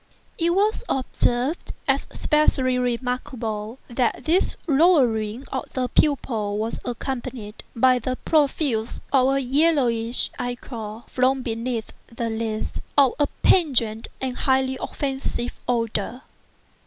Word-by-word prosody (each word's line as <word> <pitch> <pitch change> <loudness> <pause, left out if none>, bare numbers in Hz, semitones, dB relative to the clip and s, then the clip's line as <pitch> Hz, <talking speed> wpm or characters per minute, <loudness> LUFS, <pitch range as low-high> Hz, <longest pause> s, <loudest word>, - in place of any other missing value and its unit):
It 340 +1 +2
was 420 +3 +2
observed, 260 +3 0
as - - +1
especially 265 -4 +2
remarkable, 240 -2 -3
that 240 -1 0
this 340 +5 +1
lowering 265 -7 +3
of 265 - -4
the 255 -1 -1
pupil 225 -8 +1
was 220 +2 -2
accompanied 240 -3 -5
by 255 +2 +4
the 255 +2 -2
profuse 275 -6 +1 0.2
out 260 -2 +5
flowing - - +4
of 270 - +2
a - - +1
yellowish 255 -4 +2
ichor 235 -3 -5
(from 260 +1 +1
beneath 230 0 -3
the 230 0 -4
lids) 220 -1 -3 0.2
of 275 -3 +6
a 290 - +3 0.2
pungent 235 - +3
and 260 -1 -3
highly 265 0 +2
offensive 265 -3 -3
odor. 230 +1 -1
250 Hz, 120 wpm, -23 LUFS, 230-270 Hz, 0.2 s, of